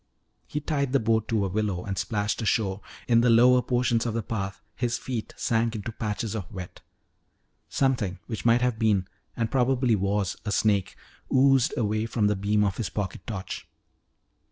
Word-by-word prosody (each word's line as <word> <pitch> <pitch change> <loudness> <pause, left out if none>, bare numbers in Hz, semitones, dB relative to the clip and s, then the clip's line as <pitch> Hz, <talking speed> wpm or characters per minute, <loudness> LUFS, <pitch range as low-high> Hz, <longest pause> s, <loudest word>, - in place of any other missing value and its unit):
He 150 - -3
tied 140 -3 -1
the 140 - +4
boat 110 -1 +1
to 110 -3 +1
a - - 0
willow 95 -2 -1
and 100 - -3
splashed 105 +4 -1
ashore. 105 -3 0 0.3
In 115 -1 +5
the 120 - +3
lower 125 +2 +6
portions 120 -1 +1
of 115 - -2
the 115 - -1
path 95 -3 -4 0.2
his 120 -1 -1
feet 120 -4 -4
sank 115 0 0
into 110 +2 -4
patches 105 -1 -3
of 105 -5 -5
wet. 95 -3 -8 0.9
Something 120 -9 0
which 110 - -5
might 120 +1 +4
have 125 -3 0
been 105 -5 +2 0.3
and 115 -2 -1
probably 125 -2 +2
was 100 0 -1
a 105 - -3
snake 100 -3 +1 0.4
oozed 135 -1 +4
away 110 0 0
from 115 -2 0
the 105 0 +3
beam 105 +2 +1
of 100 -3 0
his 115 - -2
pocket 100 -3 -4
torch. 100 -4 -5
110 Hz, 180 wpm, -26 LUFS, 100-120 Hz, 0.9 s, lower